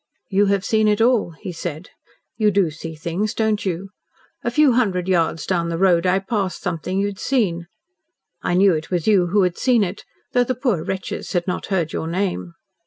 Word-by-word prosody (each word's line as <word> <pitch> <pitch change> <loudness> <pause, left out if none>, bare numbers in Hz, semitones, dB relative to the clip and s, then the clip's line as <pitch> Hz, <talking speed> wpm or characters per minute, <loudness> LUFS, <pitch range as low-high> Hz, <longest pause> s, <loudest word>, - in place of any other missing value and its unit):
"You 200 +1 +3
have 200 -1 +1
seen 220 -1 +2
it 210 0 +2
all," 225 -7 +2
he 185 - -5
said. 170 +1 -6 0.4
"You 215 -2 +3
do 195 -5 +2
see 160 +1 -8
things, 170 +7 -2
don't 220 -2 0
you? 185 +2 -3 0.5
A 240 - 0
few 290 +3 +4
hundred 195 -7 +1
yards 165 -3 +1
down 170 -2 0
the 165 - -2
road 180 -1 +3
I 180 +1 +3
passed 195 -1 -2
something 180 +2 -2
you 200 - +2
had 205 -1 -4
seen. 180 -11 0 0.7
I 175 - 0
knew 190 0 +5
it 160 0 -3
was 175 -3 -1
you 195 -5 +4
who 200 +3 +3
had 180 -1 -1
seen 245 -4 +3
it, 195 +2 -4 0.3
though 245 - +4
the 255 +1 -2
poor 230 - 0
wretches 190 -1 -4
had 175 -2 0
not 180 - -3
heard 175 -5 -1
your 160 - -3
name." 180 -1 -2
190 Hz, 205 wpm, -21 LUFS, 170-210 Hz, 0.7 s, knew